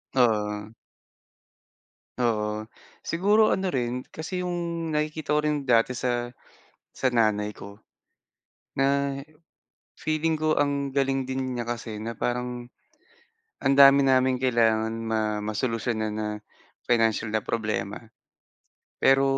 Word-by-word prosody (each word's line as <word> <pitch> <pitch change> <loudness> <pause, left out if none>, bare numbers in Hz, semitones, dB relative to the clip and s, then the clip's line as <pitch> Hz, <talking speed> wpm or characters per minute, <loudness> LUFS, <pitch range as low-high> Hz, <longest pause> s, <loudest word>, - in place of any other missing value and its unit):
Oo. 105 -3 +1 1.5
Oo. 110 -2 -1 0.3
Siguro 210 +5 +3
ano 190 -1 0
rin, 125 -1 -2
kasi 180 +3 -5
'yong 170 -2 -3
nakikita 150 0 -1
ko 150 - +4
rin 150 -2 -1
dati 125 0 +3
sa 120 -1 -1 0.6
sa 130 - 0
nanay 110 -3 +1
ko. 100 +1 -11 1.0
Na, 140 0 +1 0.8
feeling 155 +1 0
ko 155 0 +1
ang 140 -1 -1
galing 135 -1 +1
din 130 0 -3
niya 120 - -3
kasi 115 -2 -5
na 115 +1 -4
parang, 125 0 -2 1.0
ang 135 - +4
dami 140 0 +8
naming 130 -1 +3
kailangan 115 -3 +2
ma 110 -1 -1
masolusyon 115 +2 -1 0.2
na 105 0 -3 0.6
financial 115 -2 +2
na 110 - +1
problema. 105 -3 -2 1.0
Pero, 135 0 +5
125 Hz, 110 wpm, -26 LUFS, 110-140 Hz, 1.5 s, dami